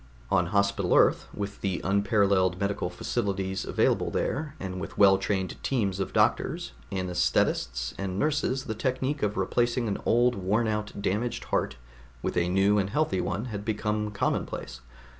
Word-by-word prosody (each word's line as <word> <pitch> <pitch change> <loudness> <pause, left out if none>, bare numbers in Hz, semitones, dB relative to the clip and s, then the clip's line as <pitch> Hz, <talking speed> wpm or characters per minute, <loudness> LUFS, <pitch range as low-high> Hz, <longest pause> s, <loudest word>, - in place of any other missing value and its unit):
On 90 -3 +3
Hospital 100 +1 +1
Earth, - - +4
with 100 0 -5
the 95 -3 -1
unparalleled 100 -2 +2
medical 100 -2 -1
facilities 95 0 -2
available - - +1
there, 150 +1 -2
and 95 -1 -5
with - - -7
well 95 -1 +6
trained 95 -3 -2
teams 100 -8 0
of 95 - -2
doctors, - - +1 0.2
anaesthetists 60 -8 0
and 95 -1 -3
nurses 145 -1 0
the 110 - -3
technique 130 +5 -1
of 105 0 0
replacing 120 0 +1
an 100 - -2
old 120 +1 +3
worn 105 +3 0
out 105 -1 -3
damaged 110 +4 -1
heart 70 - -1 0.5
with - - -2
a 90 0 +1
new 100 +3 +3
and 95 -1 0
healthy 115 -6 +1
one 105 - -2
had 100 0 -4
become 105 0 -1
commonplace. 100 -10 -3
100 Hz, 155 wpm, -27 LUFS, 95-110 Hz, 0.5 s, well